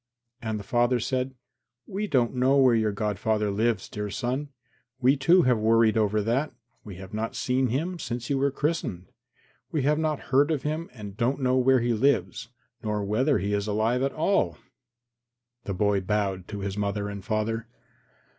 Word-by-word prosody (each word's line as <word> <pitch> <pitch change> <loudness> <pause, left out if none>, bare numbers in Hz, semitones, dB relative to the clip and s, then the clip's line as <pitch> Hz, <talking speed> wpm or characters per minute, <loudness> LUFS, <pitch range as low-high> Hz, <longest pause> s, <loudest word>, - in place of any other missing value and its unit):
And 110 -2 -2
the - - -8
father 120 +3 +2
said, 130 +2 -2 0.5
"We 205 +2 -3
don't 125 - +2
know 130 +2 +3
where 130 -3 +5
your 110 -2 +2
godfather 105 0 -1
lives, 110 0 0
dear 105 0 -5
son. 130 +6 -3 0.5
We, 130 +2 +4
too, 170 +6 +4
have 125 -4 +3
worried 115 0 +4
over 105 -1 +1
that. 125 +7 0 0.3
We 100 -3 -9
have 95 +2 -10
not 110 +1 -3
seen 130 +1 +1
him 165 +9 -2
since 120 -4 -4
you 140 -1 0
were 140 +1 +2
christened. 140 - -3 0.6
We 150 -4 0
have 150 +2 +2
not 155 -2 0
heard 140 +3 +5
of 155 -4 -1
him 155 +3 -3
and 105 -5 -9
don't 125 +5 0
know 130 -1 +2
where 130 0 +4
he 120 0 +1
lives, 120 -1 +1 0.3
nor 105 -1 -2
whether 130 +8 +2
he 100 +1 -2
is 100 0 -1
alive 110 +4 +1
at 135 +1 +1
all." 195 +6 +1 1.1
The 100 - -3
boy 100 0 +2
bowed 95 -2 -1
to 105 -2 -6
his 100 0 -3
father 100 0 -2
and 100 -1 -6
mother. 115 +1 -1
115 Hz, 180 wpm, -26 LUFS, 105-135 Hz, 1.1 s, where